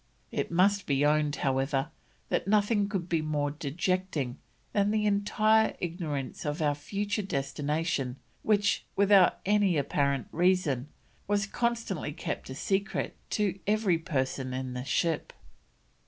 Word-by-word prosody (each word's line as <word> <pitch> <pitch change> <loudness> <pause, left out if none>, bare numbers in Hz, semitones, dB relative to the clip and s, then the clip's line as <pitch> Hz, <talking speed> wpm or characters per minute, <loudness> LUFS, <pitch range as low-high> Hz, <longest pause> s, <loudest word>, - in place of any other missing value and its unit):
It - - -2
must 195 +3 +3
be 140 0 +2
owned, 150 0 +2
however, 135 +2 0 0.4
that - - 0
nothing 205 0 +2
could 190 -5 -2
be 165 -3 +1
more 150 -2 -1
dejecting 155 -2 -2 0.4
than 205 0 +2
the 215 0 +1
entire 215 +2 +3
ignorance 165 -6 -4
of 150 0 -2
our 150 -2 +2
future 205 - -2
destination 145 -4 -1 0.3
which, 205 -1 +2
without 195 -2 +5
any 200 -4 +3
apparent 140 -2 0
reason 170 -7 +2 0.4
was 205 0 +1
constantly 225 -8 -2
kept 155 -3 -5
a 130 - -6
secret 195 +6 -1
to 200 -3 0
every 205 -5 +2
person 130 -5 -2
in 130 -1 -4
the 125 0 -5
ship." 165 +1 0
170 Hz, 130 wpm, -29 LUFS, 145-200 Hz, 0.4 s, without